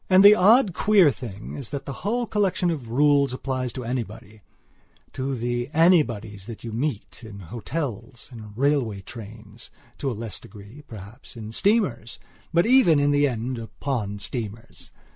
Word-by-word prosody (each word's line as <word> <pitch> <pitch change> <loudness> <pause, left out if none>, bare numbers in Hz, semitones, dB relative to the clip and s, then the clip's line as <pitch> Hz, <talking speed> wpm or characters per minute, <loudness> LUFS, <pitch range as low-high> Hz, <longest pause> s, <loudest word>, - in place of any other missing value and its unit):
And 190 +1 +6
the 205 - +11
odd, 215 +1 +5
queer 195 -7 +5
thing 110 -4 -8
is 135 -5 -5
that 140 -1 -5
the 140 - -5
whole 240 +5 0
collection 195 -5 0
of 135 -8 -5
rules 140 +1 +3
applies 130 -1 -3
to 130 - -5
anybodyto 115 +3 -7
the 120 +2 -2
anybodies 115 - +2
that 115 -2 -9
you 115 - -5
meet 120 -1 -4
in 110 -3 -10
hotels, 115 - -6
in 110 -3 -10
railway 130 -6 0
trains, 110 +1 -10 0.3
to 140 - -1
a - - -2
less 115 -2 -4
degree, 105 +8 -13
perhaps, 110 +4 -11
in 110 -1 -7
steamers, 140 - +1 0.3
but 170 +2 +3
even, 225 - +5
in 145 0 +3
the 145 0 +3
end, 125 0 -3
upon 115 -2 -4
steamers. 115 +1 -7
125 Hz, 155 wpm, -24 LUFS, 110-150 Hz, 0.3 s, the